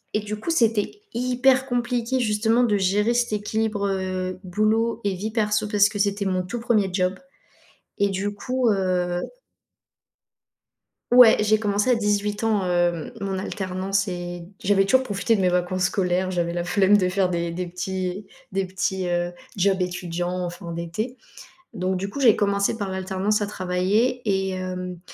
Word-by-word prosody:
et 210 Hz, -, +1 dB
du 210 Hz, 0 st, -5 dB
coup, 275 Hz, -, -5 dB
c'était 230 Hz, -, +1 dB
hyper 255 Hz, +2 st, +2 dB
compliqué, 245 Hz, 0 st, -1 dB
justement, 225 Hz, +1 st, +2 dB
de 215 Hz, -4 st, +2 dB
gérer 205 Hz, +4 st, +2 dB
cet 240 Hz, -1 st, +1 dB
équilibre, 210 Hz, 0 st, -1 dB
heu, 185 Hz, -1 st, -2 dB
boulot 215 Hz, +5 st, 0 dB
et 200 Hz, -1 st, 0 dB
vie 205 Hz, +4 st, -4 dB
perso 210 Hz, -1 st, 0 dB
parce 205 Hz, -1 st, +4 dB
que 205 Hz, -, -6 dB
c'était 200 Hz, 0 st, 0 dB
mon 185 Hz, -1 st, 0 dB
tout 200 Hz, +7 st, -5 dB
1er 220 Hz, -4 st, +1 dB
job 185 Hz, 0 st, +1 dB, 0.8 s
et 200 Hz, 0 st, +2 dB
du 200 Hz, +2 st, -2 dB
coup, 250 Hz, +4 st, -1 dB
heu 180 Hz, -3 st, 0 dB, 1.9 s
Ouais, 245 Hz, -2 st, +8 dB
j'ai 215 Hz, 0 st, +3 dB
commencé 210 Hz, +3 st, +1 dB
à -, -, +5 dB
18 210 Hz, -1 st, -1 dB
ans, 215 Hz, -4 st, +1 dB
heu, 175 Hz, -1 st, 0 dB
mon 195 Hz, -1 st, -2 dB
alternance 190 Hz, +1 st, -2 dB
et 175 Hz, -1 st, -5 dB, 0.2 s
j'avais 195 Hz, 0 st, +4 dB
toujours 260 Hz, +6 st, +3 dB
profité 220 Hz, 0 st, 0 dB
de 200 Hz, -, 0 dB
mes 185 Hz, -, +3 dB
vacances 180 Hz, +1 st, 0 dB
scolaires. 185 Hz, 0 st, 0 dB
J'avais 170 Hz, -1 st, -1 dB
la 175 Hz, 0 st, -2 dB
flemme 195 Hz, +3 st, +4 dB
de 185 Hz, -3 st, +1 dB
faire 185 Hz, 0 st, +1 dB
des 170 Hz, -1 st, -2 dB
des 180 Hz, +1 st, -4 dB
petits 185 Hz, +2 st, -4 dB, 0.3 s
des 195 Hz, 0 st, 0 dB
petits, 190 Hz, 0 st, -2 dB
heu, 175 Hz, 0 st, -1 dB, 0.2 s
jobs 195 Hz, 0 st, +2 dB
étudiants 175 Hz, 0 st, -3 dB
en 175 Hz, -, -2 dB
fin 175 Hz, -1 st, -8 dB
d'été 170 Hz, +10 st, -4 dB, 0.6 s
donc, 185 Hz, -2 st, -1 dB
du 195 Hz, +2 st, -3 dB
coup, 245 Hz, -, -6 dB
j'ai 240 Hz, -6 st, +6 dB
commencé 200 Hz, 0 st, +1 dB
par 200 Hz, -3 st, -3 dB
l'alternance 190 Hz, +3 st, -1 dB
à 205 Hz, -, -1 dB
travailler 200 Hz, +6 st, 0 dB
et 190 Hz, -1 st, +1 dB
hem 180 Hz, -1 st, -5 dB
195 Hz, 170 wpm, -24 LUFS, 185-215 Hz, 1.9 s, Ouais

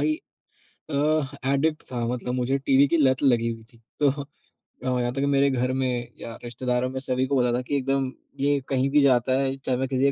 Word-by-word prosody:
ही 310 Hz, -, +2 dB, 0.8 s
अ, -, -, -5 dB
ह 145 Hz, 0 st, +1 dB, 0.2 s
एडिक्ट 155 Hz, +3 st, +1 dB
था, 120 Hz, -, -2 dB
मतलब 125 Hz, +1 st, -3 dB
मुझे 130 Hz, +2 st, 0 dB
टीवी 135 Hz, +1 st, +4 dB
की 170 Hz, -, +2 dB
लत 130 Hz, -4 st, +3 dB
लगी 120 Hz, -4 st, +3 dB
हुई 115 Hz, -1 st, -7 dB
थी। 115 Hz, -, -21 dB, 0.2 s
तो 145 Hz, -, +5 dB
अब 140 Hz, +1 st, -9 dB, 0.5 s
यहाँ 120 Hz, 0 st, 0 dB
तक 135 Hz, -, -2 dB
मेरे 140 Hz, 0 st, +3 dB
घर 125 Hz, -1 st, 0 dB
में 125 Hz, -2 st, -1 dB
या 115 Hz, -, -7 dB
रिश्तेदारों 125 Hz, +1 st, -1 dB
में 130 Hz, 0 st, -4 dB
सभी 130 Hz, -1 st, 0 dB
को 140 Hz, 0 st, +1 dB
पता 125 Hz, -1 st, +2 dB
था -, -, -1 dB
कि 125 Hz, +3 st, -3 dB
एकदम 135 Hz, -1 st, 0 dB, 0.3 s
ये 140 Hz, +1 st, +2 dB
कहीं 135 Hz, 0 st, +1 dB
भी 145 Hz, +1 st, +4 dB
जाता 130 Hz, -1 st, +3 dB
है 135 Hz, 0 st, 0 dB
चाहे 130 Hz, -2 st, -2 dB
मैं 135 Hz, +1 st, -1 dB
किसी 135 Hz, +1 st, +2 dB
130 Hz, 220 wpm, -25 LUFS, 125-140 Hz, 0.8 s, तो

